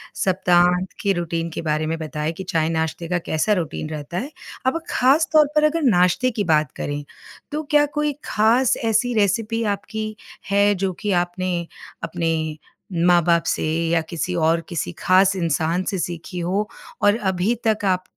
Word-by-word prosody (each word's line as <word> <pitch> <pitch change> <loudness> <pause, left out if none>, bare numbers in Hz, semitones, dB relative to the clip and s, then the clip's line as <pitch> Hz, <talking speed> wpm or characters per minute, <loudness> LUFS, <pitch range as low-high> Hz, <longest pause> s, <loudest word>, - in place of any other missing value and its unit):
सप्ताहांत 180 -1 +2
के 200 -1 +2
रुटीन 170 -1 -2
के - - -4
बारे 155 -1 -1
में 165 - -1
बताएँ 155 0 -3
कि 190 - -7
चाय-नाश्ते 160 +1 -1
का 180 +1 0
कैसा 160 +7 +1
रुटीन 160 -4 -3
रहता 155 +2 -6
है? 270 +9 -4 0.3
अब 265 +6 +1
ख़ासतौर 300 +3 +4
पर 300 - +4
अगर 310 +2 +2
नाश्ते 200 +1 +3
की 220 -3 -2
बात 155 -4 +2
करें, 145 0 -4 0.5
तो 305 +1 -2
क्या 295 0 +5
कोई 300 -1 +1
ख़ास 235 +4 +3
ऐसी 225 +2 +2
रेसिपी 225 +2 +1
आपकी 215 +2 -5 0.3
है 200 +1 +4
जो 190 0 -1
कि 210 - -1
आपने 175 0 -1 0.4
अपने 160 -2 -2 0.5
माँ-बाप 170 -1 +4
से - - 0 0.3
या 165 0 +2
किसी 175 +2 -3
और 165 0 +2
किसी 165 - -3
ख़ास 190 +1 +4
इंसान 165 0 0
से 195 - -2
सीखी 175 +1 -5
हो, 190 +5 -1 0.3
और 205 +1 +4
अभी 190 0 0
तक 215 -2 +1
आप 185 -1 +1
180 Hz, 160 wpm, -22 LUFS, 165-215 Hz, 0.5 s, क्या